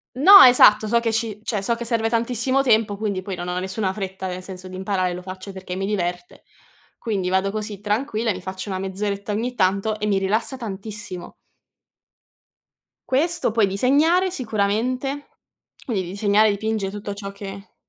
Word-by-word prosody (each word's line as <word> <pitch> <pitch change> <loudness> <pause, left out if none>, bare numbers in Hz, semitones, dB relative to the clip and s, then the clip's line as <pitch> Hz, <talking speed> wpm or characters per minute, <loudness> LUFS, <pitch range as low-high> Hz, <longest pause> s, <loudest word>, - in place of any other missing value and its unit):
No, 385 +9 +9
esatto, 220 -4 +7
so 235 +2 +3
che 230 -1 -1
ci 220 -2 -2
cioè, 210 -4 -2
so 230 +4 0
che 235 0 -6
serve 225 -1 0
tantissimo 245 +3 +1
tempo, 220 -4 +2
quindi 200 -3 -2
poi 190 0 -5
non 175 0 -6
ho 180 0 -2
nessuna 190 +1 -2
fretta 190 -2 -6
nel 180 0 -5
senso 185 0 -9
di 185 - -9
imparare, 185 -1 -1
lo 180 - -6
faccio 185 +1 -8
perché 185 -1 -7
mi 195 +1 -2
diverte. 180 -3 -3 0.6
Quindi 195 -5 -2
vado 190 +1 +1
così 210 -1 -5
tranquilla, 220 +1 -1
mi 185 -1 -8
faccio 190 +2 -6
una 190 -1 -3
mezz'oretta 200 +2 -3
ogni 240 +4 -2
tanto 200 +2 +1
e 210 - -2
mi 200 -2 +2
rilassa 220 +7 -1
tantissimo. 210 -3 -7 1.8
Questo 320 0 +1
poi 220 -3 +3
disegnare 300 - +2
sicuramente, 250 - -2 0.6
quindi 215 -8 -1
disegnare 205 +4 +2
dipinge 215 -1 -2
tutto 205 0 -6
ciò 200 -1 -7
che 200 0 -10
205 Hz, 170 wpm, -22 LUFS, 190-230 Hz, 1.8 s, No